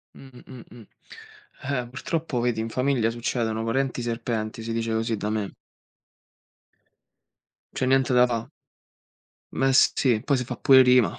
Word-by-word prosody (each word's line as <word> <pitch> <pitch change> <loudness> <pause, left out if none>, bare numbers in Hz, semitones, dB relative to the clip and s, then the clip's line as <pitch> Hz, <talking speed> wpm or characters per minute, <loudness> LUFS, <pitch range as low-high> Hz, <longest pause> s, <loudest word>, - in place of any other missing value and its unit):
Mh, 130 -2 -14
mh, 130 -2 -11
mh. 115 -3 -14 0.8
Eh, 130 -3 -3
purtroppo, 130 +2 -3
vedi, 120 -1 -1
in 110 - -3
famiglia 125 -2 +1
succedono, 115 -1 -2
parenti 130 +2 -1
serpenti, 115 -2 -3
si 115 +1 -4
dice 115 0 -2
così 115 0 -1
da 105 +1 -3
me. 105 -2 -3 2.2
C'è 130 - -1
niente 130 0 +2
da 125 0 +5
fa. 115 -2 -4 1.0
Me 135 0 +1
sì, 130 -3 +3
poi 140 - +1
se 125 - -2
fa 125 0 -6
pure 130 -1 +6
rima. 125 -7 +3
120 Hz, 145 wpm, -25 LUFS, 115-130 Hz, 2.2 s, pure